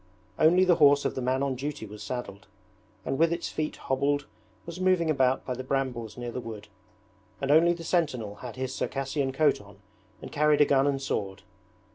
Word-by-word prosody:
Only 180 +4 +5
the 175 -2 +4
horse 145 -2 +5
of - - 0
the 130 - -4
man 130 +2 0
on 140 -1 0
duty 135 -2 -5
was 105 0 -10
saddled, 100 -8 -6 0.6
and 135 - -2
with 165 0 +4
its 170 0 -2
feet 155 0 -3
hobbled 140 +2 -1 0.4
was 170 +1 -8
moving 185 -3 +2
about 130 -3 +1
by 130 - -2
the 130 +1 -6
brambles 125 -5 -3
near 120 -1 -5
the 125 - -5
wood, 110 -3 -9 0.7
and 135 +1 0
only 165 +3 +5
the 170 -1 -8
sentinel 130 - -1
had 120 0 -8
his 130 0 -4
Circassian 135 0 -2
coat 145 -3 +2
on 100 0 -16 0.4
and - - -9
carried 150 0 +3
a - - +7
gun 135 0 +3
and 140 -1 0
sword. 100 -8 -3
135 Hz, 195 wpm, -27 LUFS, 125-150 Hz, 0.7 s, a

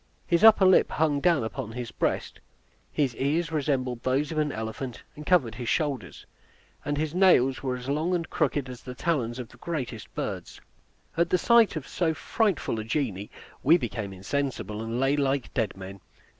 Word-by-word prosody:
His 170 +2 +1
upper 220 -3 +8
lip 185 -1 +5
hung 150 -2 +1
down 165 -6 +3
upon 110 +1 -5
his 120 -1 -5
breast. - - -2 0.5
His 135 -5 0
ears 155 +4 0
resembled 130 -5 -1
those 135 +4 0
of 155 - -1
an 150 -1 +1
elephant, 110 +2 -5
and 150 0 -10
covered 145 -12 +3
his 120 +1 -4
shoulders; 145 -5 -2 0.6
and 145 0 -2
his 155 +1 -1
nails 175 -9 +4
were 130 -2 -1
as 125 0 -8
long 155 +6 0
and 165 -2 -2
crooked 140 -3 0
as 125 -1 -9
the 125 -1 -8
talons 125 -8 -1
of 125 -3 -6
the - - -17
greatest 135 - -5
birds. - - -5 0.6
At 170 0 +2
the 180 - +3
sight 235 0 +4
of 155 -4 -5
so 165 -3 0
frightful 195 - 0
a - - -3
genie, 110 -5 -2 0.3
we 160 +6 +6
became 110 - -4
insensible, 110 +2 -3
and 115 +2 -3
lay 135 +2 +2
like 140 -2 -1
dead 110 -7 -1
men. 95 +1 -9
135 Hz, 185 wpm, -27 LUFS, 120-160 Hz, 0.6 s, upper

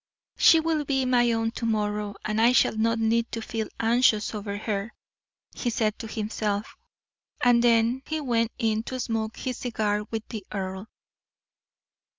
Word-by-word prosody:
"She 325 - +6
will 320 -1 0
be 270 -2 0
my 240 -1 +3
own 225 0 0
to 235 - -5
morrow, 210 -2 -1
and 215 +1 0
I 235 +2 +5
shall 240 - +3
not 230 +1 +1
need 225 +1 +1
to 230 - -2
feel 220 -1 -4
anxious 230 -2 +3
over 205 -1 -4
her," 210 +1 -3 0.6
he 245 - -2
said 220 -2 -1
to 225 - -6
himself; 215 -1 -3 0.6
and 240 -1 +4
then 235 +2 +3
he 315 0 -2
went 235 -5 0
in 220 -2 +1
to 255 - -5
smoke 225 -2 -2
his 255 -2 -4
cigar 210 -3 -1
with 225 -1 -4
the 220 -4 -6
earl. 190 +1 -4
225 Hz, 160 wpm, -26 LUFS, 215-240 Hz, 0.6 s, She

